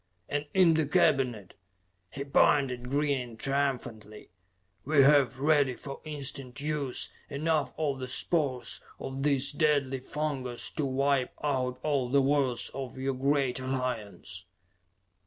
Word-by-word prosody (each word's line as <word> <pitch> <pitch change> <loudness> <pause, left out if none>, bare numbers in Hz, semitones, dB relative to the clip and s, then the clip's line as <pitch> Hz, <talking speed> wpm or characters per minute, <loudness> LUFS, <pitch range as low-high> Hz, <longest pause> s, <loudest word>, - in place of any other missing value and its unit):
And 145 0 -2
in 180 -3 +6
the 160 -2 +1
cabinet," 125 -9 +2 0.6
he 140 - -5
pointed 135 -3 +2
grinning 135 -5 -1
triumphantly 125 -6 -3 0.5
"we 145 -1 +4
have, 135 -3 +5
ready 140 -2 +3
for 140 +2 -8
instant 140 -3 -5
use, 145 -3 -2 0.2
enough 155 +2 0
of 145 -4 -1
the 130 - -4
spores 130 -1 -1 0.2
of 135 0 -5
this 140 -1 +2
deadly 145 -3 +1
fungas 130 -3 -3
to 150 - +1
wipe 135 0 +1
out 130 -3 -1
all 140 -5 0
the 140 +2 +4
worlds 135 -3 +1
of 130 -2 -6
your 135 +1 -1
great 135 -1 +1
Alliance. 120 -7 -4
135 Hz, 125 wpm, -29 LUFS, 125-145 Hz, 0.6 s, in